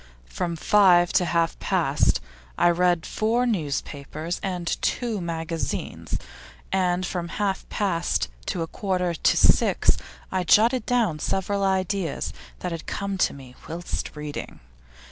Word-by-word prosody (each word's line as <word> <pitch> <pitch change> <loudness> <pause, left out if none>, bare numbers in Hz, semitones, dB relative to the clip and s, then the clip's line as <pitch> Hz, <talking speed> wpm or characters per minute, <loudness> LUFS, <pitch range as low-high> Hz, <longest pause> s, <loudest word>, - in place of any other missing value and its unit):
From 115 - -3
five 175 0 +5
to 180 - +4
half 170 -1 +1
past - - +2 0.4
I 175 - +5
read 175 -1 +2
four 230 +3 +1
newspapers 155 - -3
and 180 -3 -3 0.2
two 230 -5 -1
magazines, 165 -1 -3 0.5
and 185 -1 +1
from 175 -1 -3
half 195 +1 -2
past 175 -5 0 0.2
to 170 - -1
a - - -4
quarter 180 -2 -1
to 160 - +2
six - - +4 0.3
I 185 -1 0
jotted 230 +8 +4
down 225 -11 +2
several 195 +4 -1
ideas 190 -3 0 0.3
that 180 - -3
had 165 -1 -6
come 200 -1 -3
to - - +3
me 130 -2 -12 0.2
whilst 170 -1 -4
reading. 150 -1 -6
180 Hz, 130 wpm, -25 LUFS, 165-195 Hz, 0.5 s, five